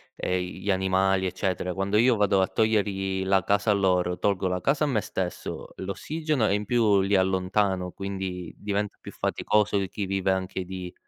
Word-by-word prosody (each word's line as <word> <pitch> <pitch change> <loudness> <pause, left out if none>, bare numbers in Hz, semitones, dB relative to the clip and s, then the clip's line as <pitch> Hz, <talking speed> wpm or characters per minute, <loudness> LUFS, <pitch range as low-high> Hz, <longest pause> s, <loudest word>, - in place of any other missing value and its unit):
ehm, 90 0 -1
i 90 0 -6
gli 100 - 0
animali, 95 0 +2
eccetera. 90 -1 -2
Quando 95 +2 0
io 120 +2 +5
vado 100 -2 +3
a 95 - +2
togliergli 95 -3 0
la 95 -1 +3
casa 100 +3 +2
a - - +5
loro, 90 -2 +1
tolgo 100 -2 +1
la 90 0 -1
casa 140 +2 +1
a - - -1
me 120 -7 +1
stesso, 90 -3 -5
l'ossigeno, 145 - -1
e - - +2
in 105 +1 -1
più 105 -3 +3
li 100 +1 +1
allontano, 95 0 +1
quindi 95 -3 -5
diventa 105 0 -2
più - - -9
faticoso 105 -1 +1
chi 100 +2 -4
vive 95 0 0
anche 95 0 -2
di 90 -1 -7
95 Hz, 185 wpm, -26 LUFS, 95-105 Hz, -, io